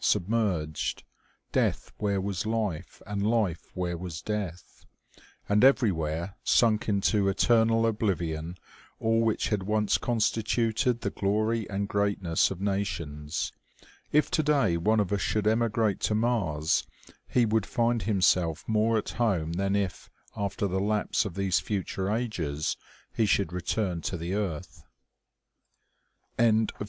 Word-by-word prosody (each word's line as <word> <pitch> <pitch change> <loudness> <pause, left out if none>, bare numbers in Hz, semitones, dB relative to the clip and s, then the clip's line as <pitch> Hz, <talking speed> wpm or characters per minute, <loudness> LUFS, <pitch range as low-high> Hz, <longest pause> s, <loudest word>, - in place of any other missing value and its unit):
submerged; 95 -6 0 0.5
death - - 0
where 100 -2 0
was 95 0 -2
life, 105 -7 -3
and 100 0 -3
life 105 -6 0
where 90 -1 -2
was 85 -2 -6
death; 100 -5 -5 0.6
and 105 +2 +3
everywhere 85 - +2
sunk 110 -2 +3
into 100 0 +2
eternal 115 +3 +3
oblivion 90 -7 -1 0.4
all 115 0 +2
which 115 -1 +1
had 105 -3 0
once 105 +2 +1
constituted 115 +1 0
the - - -2
glory 110 +3 0
and 100 0 -2
greatness 100 -5 +1
of 95 - -6
nations. 85 -7 -2 0.6
If 150 0 +3
today 145 - +2
one 105 +6 +2
of 105 -1 0
us 100 - 0
should 105 -1 0
emigrate 110 -1 +1
to 105 - 0
Mars, 100 -10 +1 0.4
he 125 -2 +3
would 110 -2 +1
find 120 -2 +1
himself 90 -5 +1
more 110 +1 +2
at 110 - -2
home 95 -9 0
than 100 +3 0
if, 100 -3 -2 0.3
after 100 0 -2
the 95 -1 0
lapse 105 +3 0
of 95 -5 -5
these 95 -2 +1
future 95 -1 -2
ages, 90 -11 -2 0.4
he 110 - +2
should 95 -4 +1
return 90 0 -1
to 90 - -3
the 85 +3 -4
earth. 85 -4 -4 1.6
CHAPTER - - +5 0.2
III. 110 - +1
100 Hz, 135 wpm, -28 LUFS, 90-110 Hz, 1.6 s, CHAPTER